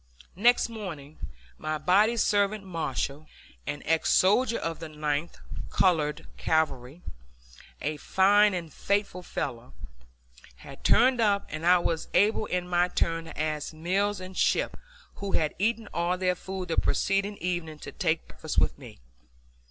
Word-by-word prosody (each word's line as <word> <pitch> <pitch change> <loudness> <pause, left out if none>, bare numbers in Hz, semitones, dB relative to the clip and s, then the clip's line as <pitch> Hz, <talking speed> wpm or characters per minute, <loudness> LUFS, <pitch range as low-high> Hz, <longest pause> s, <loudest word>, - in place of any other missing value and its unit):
Next 240 +6 +4
morning 170 -10 -8 0.4
my 155 0 -2
body 200 +9 +3
servant 205 -1 +2
Marshall, 155 -4 -3 0.4
an 145 - -4
ex 160 0 +1
soldier 230 +5 +4
of 165 -1 -4
the 165 -1 -7
Ninth 150 +1 -2 0.3
(Colored) 160 -4 +1
Cavalry, 155 -1 -1 0.8
a 150 +1 -1
fine 200 +5 +4
and 165 -4 -5
faithful 200 -2 -1
fellow, 120 - -5 0.8
had 100 - -13
turned 250 0 +4
up 200 -2 +2
and 155 +3 -3
I 180 +1 +7
was 165 -2 -1
able 215 +1 +3
in 180 -1 -2
my 175 0 +2
turn 165 -2 -1
to 160 - -9
ask 155 0 -2
Mills 195 +6 0
and 185 0 -9
Shipp, - - +1 0.4
who 200 -1 -4
had 155 -2 +1
eaten 225 +2 0
all 175 +2 0
their 180 0 +1
food 190 0 -6
the 165 - -1
preceding 200 +1 +1
evening, 175 -3 -3
to - - -9
take 165 -4 -1
breakfast - - -7
with - - +2
me. - - -12
180 Hz, 145 wpm, -28 LUFS, 155-200 Hz, 0.8 s, I